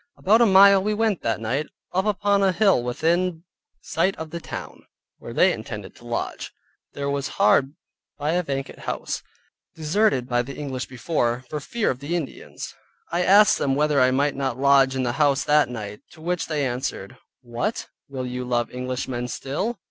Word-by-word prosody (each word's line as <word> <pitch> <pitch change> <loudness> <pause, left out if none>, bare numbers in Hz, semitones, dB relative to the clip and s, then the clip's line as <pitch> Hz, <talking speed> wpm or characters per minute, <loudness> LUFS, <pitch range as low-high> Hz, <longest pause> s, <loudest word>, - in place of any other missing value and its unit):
About 220 +5 +4
a 235 - +6
mile 195 0 +7
we 210 +2 0
went 220 -3 +1
that 110 -2 -1
night, 125 +7 -2 0.3
up 190 +2 +1
upon 205 -1 +2
a 195 -1 +4
hill 195 - +3
within 165 +7 0 0.4
sight 180 +4 0
of 160 -1 -7
the 170 - -4
town, 165 - -8 0.4
where - - -9
they - - +4
intended - - -7
to - - -14
lodge. - - -4 0.4
There 140 0 -3
was 140 0 -1
hard 140 +2 +3 0.4
by 150 +1 -1
a 175 +2 +2
vacant 135 -4 -5
house - - -4 0.5
(deserted 160 - +1
by 120 -1 +1
the 135 +3 -7
English 130 -3 -4
before, 125 -2 -1
for 150 - -2
fear 225 +9 -1
of 130 - -6
the 145 +5 -3
Indians). 160 -6 -6 0.4
I 170 +1 +1
asked 205 +3 +6
them 135 -1 +1
whether 150 -1 +2
I 130 - +5
might 140 +2 +1
not 135 -3 -2
lodge 135 -1 +4
in 130 - 0
the 120 - 0
house 145 -1 +3
that 150 -2 +3
night, 105 -4 -6
to 160 - -15
which 175 +1 -2
they 150 -3 -1
answered, 120 -6 -4 0.3
"What, 120 - -3 0.2
will 130 -2 -4
you 125 0 -4
love 120 -1 -1
English 125 0 -4
men 125 -1 -3
still?" 170 - -3
145 Hz, 185 wpm, -24 LUFS, 130-180 Hz, 0.5 s, mile